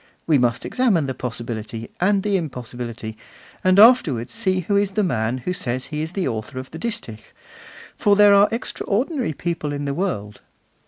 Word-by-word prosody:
We 155 -4 +3
must 120 -1 0
examine 220 - +2
the 135 - -3
possibility 115 -2 -5
and 195 +1 +3
the 205 -1 +1
impossibility, 120 - -5 0.4
and 185 +1 +4
afterwards 165 - +5
see 185 -1 0
who 200 +4 -1
is 200 -1 +1
the 210 - +1
man 120 - 0
who 180 +8 -3
says 130 -6 -2
he 150 -1 -4
is 160 +2 -4
the 190 -3 -1
author 115 +2 -4
of 130 0 -7
the 160 - -8
distich, 210 - -4 0.8
for 205 -1 +3
there 205 0 +7
are 200 +1 +6
extraordinary 240 - -2
people 165 -1 -3
in 145 0 -3
the 140 - -1
world. 105 - -3
155 Hz, 175 wpm, -22 LUFS, 120-200 Hz, 0.8 s, there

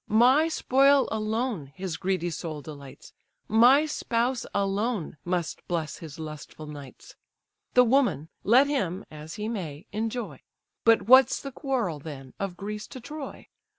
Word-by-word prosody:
My 255 +8 +5
spoil 275 -3 +4
alone 220 - -2
his 185 -3 -4
greedy 180 0 -1
soul 155 -2 -5
delights: 140 -3 -11 0.3
My 245 +7 +6
spouse 245 -4 -1
alone 200 -3 -1
must 175 -2 -2
bless 165 -3 -2
his 160 -1 -9
lustful 155 0 -8
nights: 150 - -11 0.6
The 250 - +8
woman, 245 - +2
let 250 +6 +6
him 200 - -2
(as 155 +1 -9
he 210 0 -4
may) 170 -9 -5
enjoy; 220 - -4 0.4
But 230 -1 +5
what's 260 +4 +6
the 275 - -7
quarrel, 245 - -2
then, 135 -3 -9
of 195 -3 -3
Greece 210 +2 -5
to 260 - -9
Troy? 295 +3 -8
210 Hz, 140 wpm, -27 LUFS, 160-250 Hz, 0.6 s, The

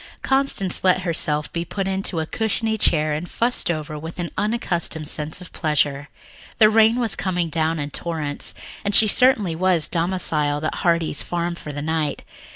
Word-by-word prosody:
Constance 270 -9 +1
let 185 0 +3
herself 150 -3 -1
be 170 - -2
put 195 +3 -4
into 190 -3 -1
a 160 - -1
cushiony 220 +4 -1
chair 155 -7 +2
and 155 +4 -4
fussed 240 -4 0
over 155 -2 -3
with 160 +2 -8
an 175 -1 -4
unaccustomed 185 -7 -2
sense 155 +2 -3
of 180 - -11
pleasure. 145 -2 0 0.5
The 215 -2 +6
rain 225 +1 +5
was 230 -4 0
coming 180 -3 -1
down 160 +1 0
in 145 -1 -4
torrents, 155 -4 -4 0.3
and 205 0 0
she 220 - +7
certainly 210 -7 +4
was 180 -2 +2
domiciled 160 -4 0
at - - -1
Heartsease 170 -4 0
Farm 175 0 -2
for 155 -3 -8
the 145 0 -5
night. 155 -2 -1
170 Hz, 170 wpm, -22 LUFS, 155-195 Hz, 0.5 s, she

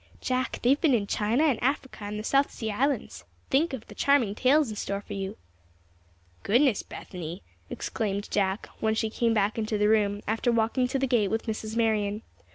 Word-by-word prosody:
Jack, 255 0 -1
they've 270 +4 +3
been 305 -7 +4
in 210 -3 0
China 220 +8 +1
and 280 -8 +2
Africa 265 -4 -2
and 205 +1 -4
the 215 - -4
South 275 +4 +2
Sea 220 -2 -4
Islands. 275 +7 -1 0.3
Think 300 +5 +3
of 260 -5 -6
the - - -12
charming 280 -8 +2
tales 260 +3 +3
in - - -6
store 200 -1 -3
for 205 - -9
you!" 195 +1 -4 1.0
"Goodness, 240 +1 +3
Bethany!" 175 +1 -8 0.3
exclaimed 205 -2 -3
Jack, 195 0 0
when 220 0 +1
she 220 0 -1
came 230 0 +1
back 210 +2 +1
into 215 -1 -1
the 210 0 +3
room 205 -2 +2
after 225 +3 +1
walking 230 +3 +1
to 265 - -1
the 270 - +1
gate 240 -6 +2
with 225 +2 -2
Mrs. 220 -1 -4
Marion. 215 -2 +1
220 Hz, 190 wpm, -27 LUFS, 205-255 Hz, 1.0 s, been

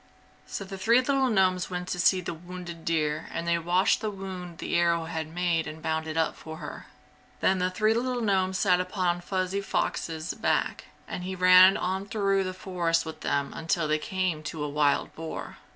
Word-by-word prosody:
So - - -4
the 195 0 -8
three 230 +5 +4
little 265 0 +2
gnomes 185 -4 +2
went 180 -1 -4
to 180 - -2
see 185 +1 +4
the 175 - -4
wounded 175 0 -9
deer 155 -1 0
and 165 +1 -4
they 170 0 +2
washed 175 +3 +2
the 215 - -1
wound 185 -4 -7
the - - -3
arrow 170 -1 +2
had 160 -1 -4
made 170 0 0
and 155 +1 -7
bound 160 0 -2
it 160 0 -4
up 160 - +1
for 160 0 -9
her. - - -8 0.5
Then 190 0 +2
the 180 0 +1
three 215 +4 +2
little 250 +2 -1
gnomes 190 -4 +1
sat 180 -3 +3
upon 180 -2 -1
Fuzzy 185 +2 -1
Fox's 165 -4 -2
back - - 0 0.2
and 180 - -5
he 190 +1 -4
ran 185 +1 +7
on 190 +2 -2
through 195 -2 +1
the 185 0 -4
forest 175 -3 0
with 160 -1 -7
them 140 -1 -1
until 160 0 -1
they 155 0 +1
came 185 -2 -1
to 155 0 -5
a - - -1
wild 145 0 +1
boar. 160 0 -7
180 Hz, 200 wpm, -27 LUFS, 165-190 Hz, 0.5 s, ran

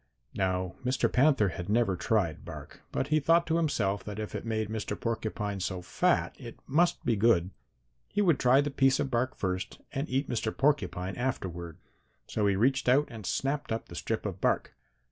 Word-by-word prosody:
"Now 95 -2 -1
Mr. 125 +1 +1
Panther 135 -6 +4
had 85 +2 -6
never 110 -3 +2
tried 95 -4 0
bark, - - -10
but 135 - -2
he 155 0 +4
thought 165 +4 +4
to 165 0 +1
himself 105 -12 0
that 105 -1 -6
if 110 -1 -5
it - - -5
made 110 -1 -1
Mr. 105 -1 -4
Porcupine 110 -3 -2
so 90 -1 -3
fat - - +1
it - - -9
must 170 +6 +2
be 120 - +2
good. 100 -4 +3 0.6
He 205 - -3
would 175 -8 +4
try 130 +2 +5
the 145 0 -2
piece 135 -1 +3
of 135 - -1
bark 125 +2 0
first 95 -1 -3
and 140 +3 -3
eat 135 +2 0
Mr. 110 -2 -2
Porcupine 135 -10 +1
afterward. 90 -10 -3 0.5
So 105 -1 0
he 100 - +3
reached 130 +5 +2
out 140 +4 +4
and 110 -4 -7
snapped 140 0 -1
up 110 - -3
the - - -9
strip - - -3
of - - -4
bark. - - +1
115 Hz, 190 wpm, -29 LUFS, 95-135 Hz, 0.6 s, try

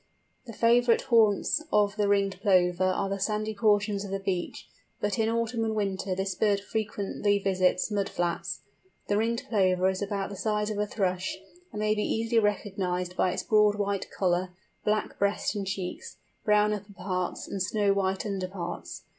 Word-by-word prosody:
The 230 - -7
favourite 235 +1 +4
haunts 225 +5 +3
of 205 -1 +3
the 210 -1 +1
Ringed 200 -1 +1
Plover 180 -2 +3
are 185 +1 +1
the 195 0 -3
sandy 215 +2 -1
portions 205 -1 +2
of 200 - -6
the 195 0 -2
beach; 190 -2 -3 0.3
but 205 +2 -1
in 220 0 +2
autumn 230 0 -1
and 220 -1 -1
winter 195 -2 -1
this 190 0 -1
bird 200 +2 +2
frequently 205 -1 -1
visits 185 0 +1
mud 200 -1 0
flats. 175 -1 -2 0.5
The 205 - +2
Ringed 230 +2 0
Plover 185 -4 +2
is 190 - -5
about 200 -1 -2
the - - -6
size 210 +1 -1
of 210 - -3
a 210 - 0
Thrush, 190 -3 -1 0.3
and 210 - -6
may 215 0 +2
be 210 - -1
easily 225 +2 +1
recognised 185 -4 -1
by 185 - +2
its - - -3
broad 210 -1 +4
white 200 -1 -2
collar, 180 -1 0 0.3
black 215 0 -1
breast 200 +1 +1
and 200 -2 -4
cheeks, 190 -2 -5 0.3
brown 210 0 +3
upper 205 0 -7
parts, 185 -1 -3
and 195 - -4
snow 205 +1 +2
white 190 0 -1
under 195 -3 -2
parts. 180 -2 -6
200 Hz, 180 wpm, -28 LUFS, 190-210 Hz, 0.5 s, favourite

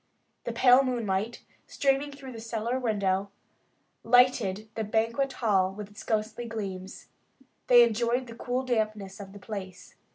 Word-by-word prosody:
The - - -2
pale 255 +1 +6
moonlight, 230 -4 -2 0.2
streaming 275 +1 0
through 275 -2 -10
the 225 -2 -8
cellar 230 +2 -2
window, 200 -4 0 0.7
lighted 230 -4 +3
their 220 - -3
banquet 230 +5 0
hall 195 -5 +2
with 205 +1 -8
its 205 - -11
ghostly 220 +2 -2
gleams. 195 -4 -6 0.6
They 240 -1 +8
enjoyed 235 +2 +1
the 235 - -10
cool 250 +2 -2
dampness 215 -5 -2
of 195 -1 -9
the 205 - -11
place. 190 -2 -8
225 Hz, 140 wpm, -28 LUFS, 200-245 Hz, 0.7 s, They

